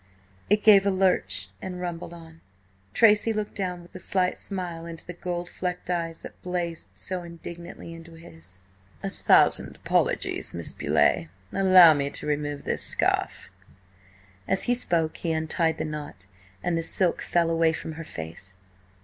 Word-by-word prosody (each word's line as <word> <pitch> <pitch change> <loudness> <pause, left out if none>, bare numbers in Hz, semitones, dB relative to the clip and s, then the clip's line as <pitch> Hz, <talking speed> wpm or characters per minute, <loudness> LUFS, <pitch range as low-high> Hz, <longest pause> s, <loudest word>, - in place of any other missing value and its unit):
It 210 +1 +3
gave 200 -2 +7
a - - +5
lurch 190 -1 +1
and 180 -1 -5
rumbled 175 -1 -5
on. 165 -1 -13 0.5
Tracy 215 - +5
looked 215 -1 -3
down 180 -3 -3
with 175 - -17
a 185 - -8
slight 185 -1 +1
smile 175 -4 -4
into 165 -1 -8
the 175 - -7
gold 175 0 -4
flecked 180 0 -4
eyes 165 -2 -2
that - - -11
blazed 175 -2 -3
so 185 -1 -4
indignantly 170 0 -9
into 165 0 -12
his. 90 - -7 0.4
"A - - -2
thousand - - +4
apologies, - - -1
Miss 85 -1 -3
Beauleigh! 85 - +2 0.3
Allow 185 -4 +8
me 140 -1 -1
to - - -2
remove 145 -1 -2
this - - -2
scarf." - - 0 1.0
As 190 - +2
he 245 - +2
spoke 170 -10 0
he 165 -2 -1
untied 160 +1 0
the - - -2
knot, 150 -11 -6 0.4
and 175 -1 0
the 165 - 0
silk 175 +2 +1
fell 170 -1 +1
away 165 0 +3
from 160 - -5
her 160 +1 -7
face. 85 - -8
170 Hz, 160 wpm, -26 LUFS, 160-180 Hz, 1.0 s, Allow